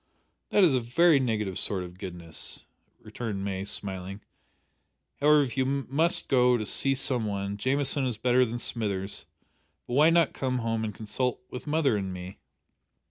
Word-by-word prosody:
"That 205 - +4
is 165 -6 +5
a 130 - +3
very 140 +6 +4
negative 105 -7 -1
sort 95 -3 -2
of 90 +1 -11
goodness," 85 -4 -5 0.4
returned 105 -5 -5
May, 95 -1 -3
smiling. 100 -1 -3 1.0
"However, 150 +1 +5
if 130 -3 -5
you 130 - +2
must 140 +5 0
go 125 -2 +4
to 110 - -3
see 135 +6 +3
some 125 -4 0
one, 100 0 -3
Jamieson 135 +4 +1
is 120 -4 -3
better 125 +2 +3
than 120 -1 -2
Smithers; 100 -5 -2 0.6
but 120 - -6
why 150 +5 +6
not 165 -2 +3
come 130 -1 -1
home 115 -2 -1
and 105 -2 -4
consult 125 +4 -2
with 125 - -7
mother 150 -7 +2
and 95 -2 -3
me?" 90 +1 -8
120 Hz, 165 wpm, -27 LUFS, 100-135 Hz, 1.0 s, why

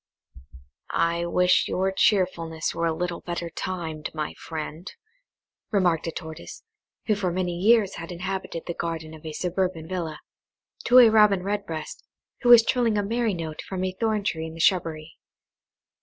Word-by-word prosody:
"I 170 +1 0
WISH 180 +1 +3
your 190 +1 0
cheerfulness 180 -5 +1
were 170 - 0
a - - +1
little 175 +2 -3
better 170 -1 -4
timed, 160 -4 -4
my 155 -1 -3
friend," 160 +2 -7 0.8
remarked 175 -6 +1
a - - -1
Tortoise, 160 - -9 0.4
who 215 - +2
for 195 -3 -1
many 180 -1 -2
years 205 +2 +3
had 165 +1 -7
inhabited 180 -1 -4
the 170 - -3
garden 165 -2 -4
of 155 - -12
a 160 - -5
suburban 180 0 -2
villa, 170 -4 -4 0.7
to 245 - +6
a 245 -3 +9
Robin 210 -4 +5
Redbreast, 195 -6 -4 0.4
who 245 - +2
was 235 -2 +9
trilling 235 -4 +1
a 205 - +1
merry 225 0 0
note 160 -2 -5
from 185 -1 -5
a 185 - 0
thorn 215 +2 -1
tree 160 -5 -2
in 160 - -9
the - - -10
shrubbery. 165 -3 0
180 Hz, 160 wpm, -25 LUFS, 165-195 Hz, 0.8 s, a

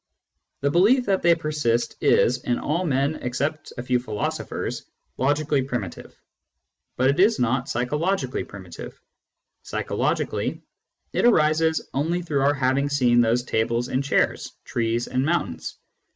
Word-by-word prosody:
The 140 0 +1
belief 225 - +4
that 195 -2 +1
they 170 0 +5
persist 150 -7 -1
is, 125 +2 +3
in 120 - 0
all 165 +5 -1
men 140 0 0
except 145 +5 -3
a 120 - -4
few 125 0 +1
philosophers, 110 -4 -4 0.3
logically 145 +1 +1
primitive, 125 -9 -6 0.8
but 130 +2 +4
it 140 - -3
is 210 +4 +5
not 125 +2 0
psychologically 150 +11 -1
primitive; - - -10 0.6
psychologically, - - -2 0.5
it - - +1
arises 160 -6 +3
only 165 +6 -1
through 150 -5 -1
our 140 +2 +3
having 135 +1 +1
seen 125 -4 +3
those 120 +1 +2
tables 115 +1 -1
and 130 +2 0
chairs, 140 - 0
trees 115 0 -1
and 130 0 0
mountains. 150 - -2
140 Hz, 135 wpm, -24 LUFS, 125-155 Hz, 0.8 s, they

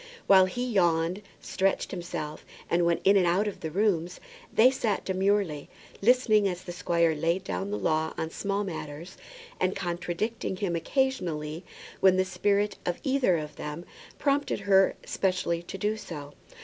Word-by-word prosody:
While 190 -1 +6
he 245 +7 -3
yawned, 175 -4 +1 0.2
stretched 195 0 0
himself, 170 -4 -5 0.3
and 170 0 +3
went 170 0 +1
in 195 +1 +5
and 180 -2 +3
out 190 +5 +2
of 205 - -5
the 160 - -4
room, 180 -1 +1 0.4
they 250 +4 +6
sat 225 -6 -1
demurely, 190 -5 0 0.3
listening 215 -2 +4
as 180 -1 -4
the 175 - -7
squire 170 -2 +1
laid 165 +4 0
down 195 - -3
the 205 - -2
law 160 0 0
on 160 - -3
small 200 +2 -2
matters, 165 -1 -7 0.4
and 185 - +1
contradicting 190 +4 -3
him 185 -3 -1
occasionally 170 - -1 0.4
when 190 -1 +5
the 185 - +2
spirit 205 +2 0
of 175 - -2
either 265 - +2
of 150 -1 -6
them 150 +4 -6 0.3
prompted 280 -5 0
her 195 -1 +4
specially 180 -3 0
to 175 +2 -8
do 210 +2 0
so. 145 -8 -8
185 Hz, 160 wpm, -28 LUFS, 170-205 Hz, 0.4 s, While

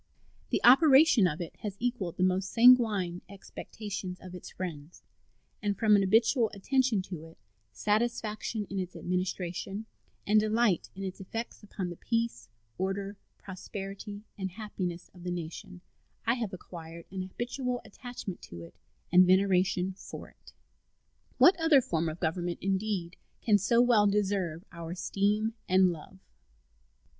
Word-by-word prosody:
The - - 0
operation 270 - +7
of 170 +1 -3
it 170 - -7
has 205 -3 -6
equaled 225 -8 -2
the 185 - +1
most 185 +1 +1
sanguine 220 -8 +5
expectations 200 -1 -7
of 185 -1 -11
its 180 - -9
friends, 165 -3 -7 0.6
and 205 -2 -1
from 215 -2 +5
an 200 - +4
habitual 225 +4 +3
attention 250 -1 +1
to 180 -4 -7
it, 165 - -15 0.3
satisfaction 215 - -1
in 195 - -2
its 180 -1 -5
administration, 180 +3 -3 0.4
and 215 +1 +5
delight 215 -3 +1
in 195 - -6
its 190 0 -5
effects 225 +5 -6
upon 195 -4 -5
the 175 - -8
peace, 230 - -2 0.3
order, 195 +2 -2 0.2
prosperity, 195 +2 -7 0.2
and 190 -1 -2
happiness 180 -3 -5
of 180 - -14
the 180 - -4
nation 175 +1 -6 0.4
I 230 - +3
have 230 -5 -3
acquired 170 -3 -9
an 190 -1 -4
habitual 245 +6 -3
attachment 245 -7 -8
to 85 -1 -8
it 85 - -12 0.4
and 180 +1 +7
veneration 185 0 +3
for 185 - -10
it. - - -19 0.9
What 360 - +7
other 325 -4 +6
form 165 -9 -1
of 155 +2 -7
government, 175 +1 -1
indeed, 195 -2 -2 0.2
can 210 -3 +3
so 235 +4 +3
well 225 -4 +5
deserve 195 -4 0
our 170 -2 -7
esteem 205 +4 0 0.2
and 185 0 +5
love? 170 +3 -10
195 Hz, 145 wpm, -30 LUFS, 180-220 Hz, 0.9 s, operation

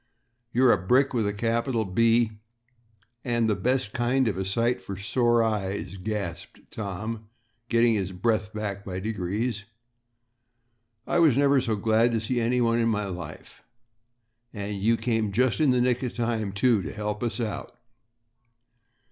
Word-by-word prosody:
"You're 125 +1 +5
a 100 - +3
brick 135 +8 +3
with 115 -4 +1
a - - 0
capital 115 +2 0
B 115 +2 +2 0.8
and 120 -2 +1
the 110 - +2
best 125 -4 -1
kind 120 +2 +1
of 105 - 0
a 95 - -2
sight 115 +6 0
for 100 - -7
sore 120 +3 +2
eyes," 100 -4 -2
gasped 100 -2 -6
Tom, 105 +2 -5 0.4
getting 115 0 +4
his 95 -3 -1
breath 105 +2 0
back 100 -2 -4
by 95 -2 -5
degrees. 105 +2 -3 1.4
"I 175 - +1
never 140 -3 +4
was 130 - +1
so 110 -3 0
glad 110 +3 +2
to 115 - +1
see 120 +3 -1
anyone 120 0 +2
in 115 0 +2
my 105 -2 0
life. 90 -5 -8 0.9
And 100 -2 -5
you 115 +3 +3
came 110 -3 0
just 125 +6 +1
in 155 -3 +4
the 125 -1 +3
nick 125 0 +1
of 125 -3 -4
time, 115 -4 -1
too, 105 +1 +2
to 75 - -5
help 105 -1 -4
us 120 0 -2
out." 110 -4 -4
110 Hz, 155 wpm, -26 LUFS, 100-120 Hz, 1.4 s, You're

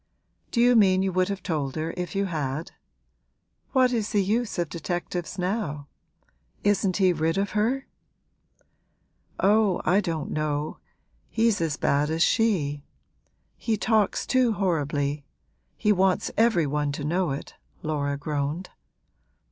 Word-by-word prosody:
'Do 235 - -1
you 245 +1 +5
mean 190 -4 +5
you 190 - 0
would 185 +1 +1
have 195 -2 -4
told 145 -7 -2
her 160 +1 -3
if 180 +1 -4
you 200 0 +1
had? 155 -3 -3 1.0
What 255 -2 +3
is 225 -2 0
the 205 -2 +2
use 220 +3 -1
of 175 -1 0
detectives 175 +2 -4
now? 180 -7 -2 0.7
Isn't 200 -2 +2
he 185 -3 +4
rid 165 +2 0
of 200 +1 0
her?' 235 +6 0 1.5
'Oh, 205 -1 +3
I 190 +3 +4
don't 165 -5 -3
know, 150 0 -2 0.5
he's 225 -4 +2
as 155 -3 -1
bad 145 +2 +1
as 160 +1 +2
she; 160 -11 +1 0.7
he 225 -2 -1
talks 215 -2 +1
too 255 -3 +3
horribly 150 -6 -1 0.5
he 210 - +2
wants 190 -2 +2
every 220 -7 +3
one 145 0 -1
to 145 - -5
know 175 +3 0
it,' 140 +1 -5 0.3
Laura 145 -2 -1
groaned. 150 +4 -3
180 Hz, 140 wpm, -26 LUFS, 150-205 Hz, 1.5 s, you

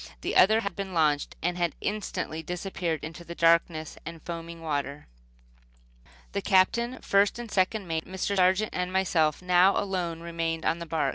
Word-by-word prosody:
The - - -2
other 215 +4 +6
had 200 -5 -4
been 195 -2 -5
launched, 150 -3 +1
and 175 +1 -1
had 170 -2 0
instantly 200 -6 -3
disappeared 175 -1 -3
in 160 - -4
the 170 +1 -9
darkness 165 -2 +2
and 165 +1 -8
foaming 170 0 -6
water. 145 -2 -3 1.3
The 200 - -2
Captain, 235 +7 +2
first 200 +2 +3
and 240 -2 -7
second 195 +2 +1
mate, 160 -1 -2
Mr. 190 +2 -2
Sargent 190 +3 +3
and 180 0 -2
myself 175 -4 +1
now 180 +2 +5
alone 180 -4 -2
remained 165 -1 -3
on 165 - +1
the 170 - -6
bark. 160 -1 0
175 Hz, 165 wpm, -27 LUFS, 165-190 Hz, 1.3 s, other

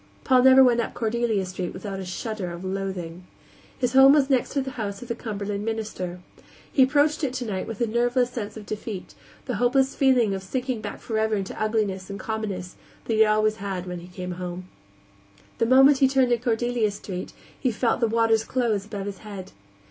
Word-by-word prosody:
Paul 255 -2 +5
never 265 +1 +8
went 240 -2 +4
up 235 - -2
Cordelia 225 -3 0
Street 185 -1 -5
without 195 -2 -5
a 190 - -5
shudder 195 0 -4
of 175 +2 -7
loathing. 185 -2 -4 0.5
His 250 -1 -1
home 270 +1 +8
was 285 -2 +3
next 260 -2 +2
to 275 - +1
the 265 - -5
house 205 -3 -5
of 245 - -12
the - - 0
Cumberland 205 -3 -4
minister. 210 -5 -4 0.5
He 270 - +4
approached 295 +4 +3
it 260 -3 0
tonight 220 -7 -3
with 225 - -5
the 235 - +1
nerveless 240 +2 +1
sense 220 -3 -5
of 215 - -9
defeat, 210 -2 -6 0.3
the - - -2
hopeless 265 +2 +2
feeling 250 -6 +3
of 190 - -3
sinking 250 +4 -3
back - - -7
forever 220 -1 0
into 195 0 -4
ugliness 205 -4 -1
and 200 - -6
commonness 200 -5 -4 0.3
that 230 - -1
he 220 - +1
had 220 -1 +6
always 215 0 +2
had 195 -3 -4
when 180 -1 -5
he 175 - -11
came 180 0 -6
home. 180 0 -6 0.9
The 230 - +2
moment 270 +2 +6
he 270 - +6
turned 260 -2 +2
into 240 0 +1
Cordelia 240 -1 +1
Street 190 -2 -6 0.3
he 260 - +1
felt 230 +1 0
the 235 - +2
waters 225 0 +2
close 225 -6 -1
above 205 -2 -5
his 200 -1 -6
head. 200 -4 -9
220 Hz, 200 wpm, -25 LUFS, 195-245 Hz, 0.9 s, never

